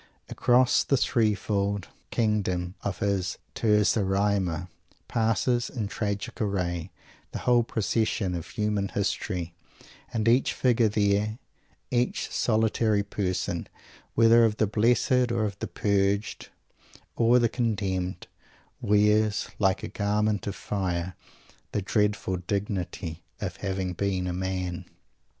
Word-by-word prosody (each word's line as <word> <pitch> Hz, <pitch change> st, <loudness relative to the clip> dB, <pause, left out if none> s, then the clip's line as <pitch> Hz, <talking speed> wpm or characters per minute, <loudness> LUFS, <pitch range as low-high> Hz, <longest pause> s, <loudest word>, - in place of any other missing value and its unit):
Across 125 Hz, +1 st, +3 dB
the 140 Hz, -, +2 dB
three 110 Hz, -4 st, +2 dB
fold 100 Hz, 0 st, -1 dB, 0.2 s
kingdom 95 Hz, -6 st, 0 dB
of 95 Hz, -3 st, -3 dB
his 95 Hz, -2 st, 0 dB, 0.2 s
"Terza 105 Hz, -1 st, +3 dB
Rima" 95 Hz, -3 st, 0 dB, 0.4 s
passes, 115 Hz, +2 st, +1 dB
in 110 Hz, -5 st, -3 dB
tragic 100 Hz, -1 st, -3 dB
array, 90 Hz, -4 st, -1 dB, 0.4 s
the -, -, -2 dB
whole 120 Hz, -1 st, +5 dB
procession 110 Hz, -3 st, 0 dB
of 85 Hz, -2 st, -4 dB
human 105 Hz, -2 st, -1 dB
history 95 Hz, -3 st, -2 dB, 0.6 s
and 115 Hz, -2 st, -1 dB
each 120 Hz, +3 st, +4 dB
figure 120 Hz, -3 st, +3 dB
there, 105 Hz, +1 st, +1 dB, 0.5 s
each 125 Hz, 0 st, 0 dB
solitary 110 Hz, -2 st, +2 dB
person, 95 Hz, -2 st, -2 dB, 0.5 s
whether 115 Hz, +1 st, +6 dB
of 110 Hz, -2 st, +2 dB
the 110 Hz, -, +3 dB
Blessed 120 Hz, +4 st, +2 dB
or 110 Hz, -2 st, +1 dB
the -, -, -3 dB
Purged, 100 Hz, +1 st, 0 dB, 0.7 s
or 120 Hz, +1 st, +4 dB
the 120 Hz, -1 st, +4 dB
Condemned, 95 Hz, -7 st, -2 dB, 0.6 s
wears, 105 Hz, +1 st, +3 dB
like 95 Hz, -2 st, +2 dB
a -, -, -2 dB
garment 105 Hz, 0 st, 0 dB
of 100 Hz, -, -3 dB
fire, 90 Hz, -3 st, -2 dB, 0.6 s
the 105 Hz, -, 0 dB
dreadful 105 Hz, -2 st, 0 dB
dignity 90 Hz, -3 st, -3 dB, 0.2 s
of 95 Hz, -2 st, -4 dB
having 95 Hz, -2 st, -2 dB
been 95 Hz, 0 st, -1 dB
a 90 Hz, -, -2 dB
man! 90 Hz, -1 st, -3 dB
105 Hz, 120 wpm, -27 LUFS, 95-110 Hz, 0.7 s, whether